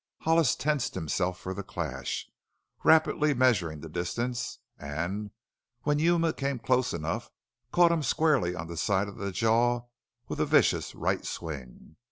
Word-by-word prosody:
Hollis 160 -4 +3
tensed 150 -3 -1
himself 90 +3 -1
for 95 - -5
the 100 - -5
clash, 80 -9 -4 0.6
rapidly 155 -2 +4
measuring 90 - +2
the 80 - -7
distance, 120 +9 -3 0.2
and 85 +9 -3 0.5
when 145 0 +2
Yuma 165 0 +3
came 135 -1 -2
close 130 +1 +1
enough 80 -1 -3 0.4
caught 175 -1 +5
him 165 -2 +1
squarely 140 - +2
on 80 - -5
the 85 0 -7
side 100 +4 +1
of 100 - -9
the 100 -1 -3
jaw 115 +4 +2 0.5
with - - -5
a - - +3
vicious - - +3
right - - -1
swing. 70 -2 -7
110 Hz, 150 wpm, -29 LUFS, 85-145 Hz, 0.6 s, caught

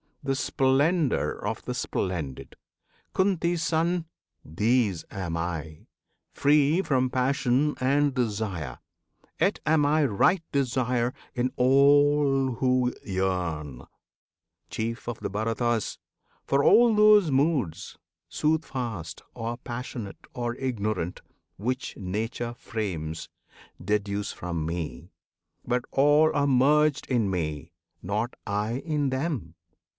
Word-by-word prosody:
The 135 -1 0
splendour 140 +4 +2
of - - -5
the - - -3
splendid. 80 -9 -3 0.6
Kunti's 175 -3 +1
Son! 170 +1 +1 0.4
These 105 +2 +1
am 90 -5 -4
I, 80 -2 -5 0.4
free 150 +5 +3
from 130 -5 +1
passion 130 +2 +1
and 140 +2 +2
desire; 105 - -2 0.6
Yet - - +2
am 155 -1 +3
I 150 +1 +3
right 160 - +2
desire 125 -2 0 0.2
in 125 +1 0
all 140 0 +4
who 125 0 +1
yearn, 90 -8 -2 0.9
Chief 115 +1 -4
of 120 -2 -4
the - - -3
Bharatas! 115 +2 -1 0.5
for 140 +1 +2
all 235 -2 +6
those 210 -5 +6
moods, 135 - 0 0.3
Soothfast, 130 - -2
or 115 +1 -4
passionate, 120 -4 -7
or 120 -1 -2
ignorant, 110 -9 -2 0.4
Which 125 +6 -3
Nature 110 +5 -3
frames, 85 -10 -4 0.6
deduce 105 -1 -1
from 85 -3 -4
me; 80 -7 -5 0.5
but 125 0 0
all 145 +3 +4
Are 145 0 +2
merged 145 +3 +3
in 115 -6 +1
me 75 -6 -3 0.3
not 105 +6 -2
I 105 +4 -1
in 150 -4 0
them! 130 - -3
125 Hz, 105 wpm, -27 LUFS, 100-145 Hz, 0.9 s, all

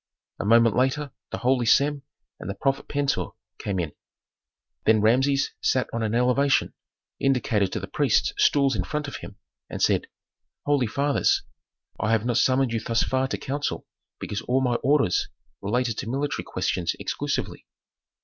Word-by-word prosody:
A - - -3
moment 115 +1 +5
later 135 +3 0 0.2
the - - -4
holy 125 -1 +1
Sem 140 +3 +3 0.4
and 90 - -7
the 100 - -3
prophet 135 +6 -1
Pentuer 140 -1 -1 0.3
came 100 -2 -3
in. 80 -4 -2 0.9
Then 110 0 +5
Rameses 135 +6 +2
sat 130 - +1
on 115 - -2
an 110 0 -1
elevation, 125 +3 +2 0.5
indicated 115 -7 +1
to - - -2
the - - -5
priests - - +1
stools 140 -3 +3
in 95 - 0
front 150 -1 -3
of 140 - -6
him, - - -10 0.3
and - - -5
said, - - +2 0.6
"Holy 145 -4 +2
fathers! 140 +5 +1 0.6
I 110 +3 +1
have 110 0 +1
not 120 -1 +1
summoned 130 -2 +2
you 115 - 0
thus 115 +1 0
far 130 0 0
to - - -3
counsel 145 +2 -3 0.3
because 105 - -4
all 130 +2 +1
my 125 -2 +1
orders 140 -10 +2 0.3
related 115 +2 -1
to - - -4
military 140 +3 -2
questions 85 -2 -1
exclusively." - - -3
125 Hz, 160 wpm, -25 LUFS, 115-140 Hz, 0.9 s, moment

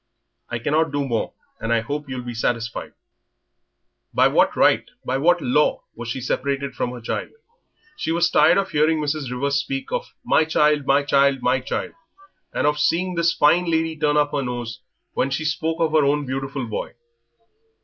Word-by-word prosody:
I 120 - -2
cannot 150 +6 +1
do 145 -1 -1
more, 115 -3 -2 0.2
and 115 +1 -3
I 115 -1 +3
hope 145 +4 -5
you'll 130 -2 -4
be 120 0 -6
satisfied." 115 0 -2 1.2
By - - +5
what - - +3
right, - - +3 0.2
by 130 +1 -1
what 175 +3 +3
law, 150 +5 +2
was 120 0 -7
she 130 +2 -3
separated 140 +2 -2
from - - -2
her 125 0 -7
child? 115 - -3 0.7
She 160 - -2
was 170 +1 +2
tired 160 +4 +5
of 195 0 0
hearing 155 +2 +3
Mrs. 150 -2 -2
Rivers 140 +3 0
speak 135 0 -4
of - - -4
"my - - +3
child, 150 -2 +2
my 140 +1 +4
child, 140 -1 +2
my 130 +1 +2
child," 130 +2 -4 0.6
and - - -1
of 150 0 +2
seeing 180 +4 +1
this 170 0 +2
fine 165 +4 +3
lady 160 0 0
turn 150 -1 +1
up 145 0 +2
her 145 - -1
nose 120 -2 -4 0.3
when 135 - 0
she 135 +4 -2
spoke 160 +2 -1
of 160 -2 +1
her 155 -1 +4
own 145 +1 +1
beautiful 135 0 -3
boy. 110 +1 -5
140 Hz, 185 wpm, -22 LUFS, 130-155 Hz, 1.2 s, By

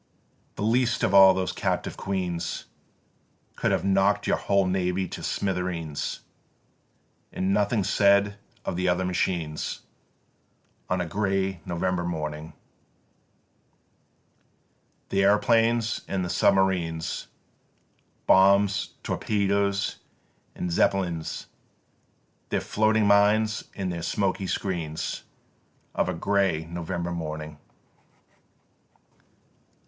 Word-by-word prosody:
6. - - -42
"The 105 - -4
least 120 +2 +2
of 95 - +2
all 95 -1 +8
those 95 0 -1
captive - - -2
queens 90 -3 -3 0.9
Could - - 0
have - - 0
knock'd 100 +1 +2
your - - +2
whole 100 -1 +2
navy 90 0 0
to - - -7
smithereens, 90 -6 -3 1.1
And 95 +1 0
nothing 105 +1 +1
said 100 +1 +3 0.3
of - - -2
the 90 +1 +1
other 90 +1 +1
machines, 85 -3 -2 1.1
On 90 0 +1
a - - -1
grey 95 -1 -1
November 90 +1 -1
morning, 80 -2 -4 2.6
The 100 - +1
aeroplanes 115 +3 +3
and 95 -2 -1
the 90 - -3
submarines, 90 -4 +1 1.0
Bombs, 100 +1 +4
torpedoes, 100 -1 0 0.6
and 90 - -3
Zeppelins, 85 -2 0 1.0
Their - - +1
floating 110 0 +2
mines 105 +1 +3
and 95 -3 -3
their 85 - -4
smoky 95 +2 -1
screens, 85 -4 -3 0.7
Of - - 0
a - - -2
grey 95 -5 +1
November 85 +1 -4
morning. 75 -3 -5
95 Hz, 100 wpm, -26 LUFS, 85-100 Hz, 2.6 s, all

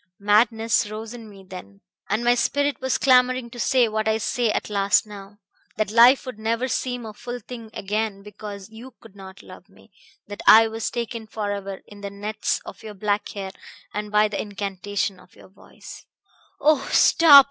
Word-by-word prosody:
Madness 220 +1 +2
rose 220 +2 -7
in 230 -3 -10
me 195 -2 -14
then, 100 - -11 0.3
and 215 +4 0
my 240 0 +4
spirit 285 +3 0
was 260 0 0
clamoring 255 -2 +3
to 240 - -10
say 250 0 +3
what 215 0 -2
I 220 0 +2
say 230 +1 -1
at - - -1
last 200 -1 +2
now 205 -1 -12 0.4
that 215 -1 -1
life 240 +4 +6
would 255 -4 -8
never 230 +3 -1
seem 245 0 -3
a 215 - -8
full 245 +3 -7
thing 230 0 -10
again 210 -1 -3
because 205 0 -9
you 235 +3 -12
could 220 -3 -17
not 190 -1 -12
love 185 +1 -14
me, 195 - -22 0.3
that 205 0 -8
I 225 +1 +9
was 220 -1 -3
taken 235 -2 -5
forever 205 -3 -5
in 205 -1 -14
the 200 - -5
nets 205 +2 -3
of - - -10
your 215 -2 -9
black 205 +1 -1
hair 195 -2 -6 0.4
and 210 0 -4
by 210 0 +4
the 205 -1 -3
incantation 200 -1 -4
of 185 - -21
your - - -17
voice 190 - -14 0.3
" - - -34
"Oh, 305 -2 +4
stop!" 305 -4 +8
215 Hz, 190 wpm, -23 LUFS, 200-235 Hz, 0.4 s, I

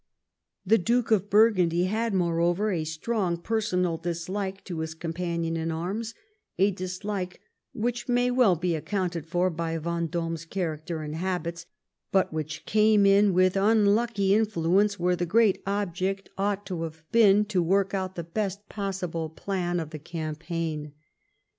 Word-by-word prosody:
The 225 +4 +4
Duke 235 +5 +1
of 205 -2 +2
Burgundy 185 -6 +4
had, 220 +5 0
moreover, 175 +3 +1
a 165 -4 -1
strong 175 +3 -1
personal 180 -4 0
dislike 190 +4 -4
to 175 -4 -5
his 160 0 -4
companion 170 0 -2
in 165 0 -2
arms, 200 +8 -3 0.4
a 195 +3 +4
dislike 185 0 -4 0.3
which 240 +2 -3
may 245 0 +2
well 245 -7 +4
be 170 +1 -1
accounted 175 -1 -2
for 180 +2 +1
by 165 0 -2
Vendome's 165 0 -2
character 160 -3 -3
and 150 0 -5
habits, 170 0 -3 0.4
but 190 -4 +2
which 155 0 -4
came 215 -1 +4
in 200 +1 +5
with 185 +1 +3
unlucky 205 0 +3
influence 205 -1 +2
where 180 +1 +2
the 175 0 -2
great 215 +1 +3
object 195 -1 -2
ought 200 +1 -1
to 180 -4 -4
have 160 -1 -6
been 210 -2 +5
to 200 -4 0
work 195 +3 +1
out 190 -1 -2
the 170 - -4
best 200 +3 -3
possible 180 -5 -3
plan 175 +1 -2
of 160 -2 -5
campaign. 155 -2 -4
185 Hz, 145 wpm, -27 LUFS, 165-205 Hz, 0.4 s, in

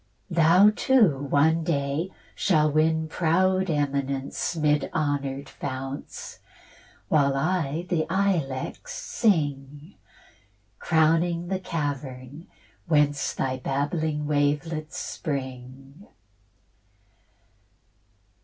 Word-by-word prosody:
Thou 175 +5 +6
too 220 - +3
one 160 +4 +3
day 145 +2 -1 0.2
shalt 155 -5 +2
win 160 +1 +2
proud 185 +3 +1
eminence 140 0 -1
'Mid 150 -2 +1
honour'd 140 -2 -1
founts, 135 0 -7 0.7
while 140 -3 +3
I 160 +1 -1
the 170 -4 0
ilex 185 - -1
sing 145 - -1 0.9
Crowning 165 +1 +2
the 190 -1 -1
cavern, 145 -3 -5 0.4
whence 145 -2 +2
Thy 130 -1 -1
babbling 150 +3 -2
wavelets 150 +2 -1
spring. 135 +3 -6
150 Hz, 80 wpm, -25 LUFS, 140-170 Hz, 0.9 s, Thou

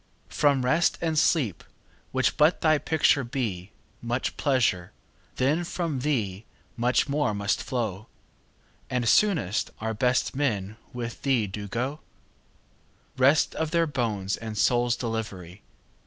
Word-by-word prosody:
From 135 - +2
Rest 160 +6 +2
and 165 -1 -1
Sleep, 145 - +1 0.5
which 130 0 +1
but 155 +3 +3
thy 155 -2 +4
picture 145 -3 +2
be, 115 -8 -3 0.3
5 - - -36
Much 120 +2 -1
pleasure, 120 - +1 0.4
then 145 +7 +1
from 170 -5 -3
thee 110 -9 -1 0.3
much 125 +3 +1
more 140 -6 0
must 100 +1 0
flow; 110 -4 -3 0.8
And 125 -2 -1
soonest 160 - +2
our 110 +1 -2
best 125 +4 +1
men 110 -8 -1 0.2
with 120 -2 -6
thee 130 -6 +2
do 100 +1 -6
go— 125 +9 -3 1.2
Rest 135 +4 +4
of 160 -1 -2
their 170 +1 +2
bones 110 -9 -2
and 110 -2 -6
souls' 120 +2 +2
delivery! 105 -5 -5
125 Hz, 130 wpm, -26 LUFS, 105-145 Hz, 1.2 s, thy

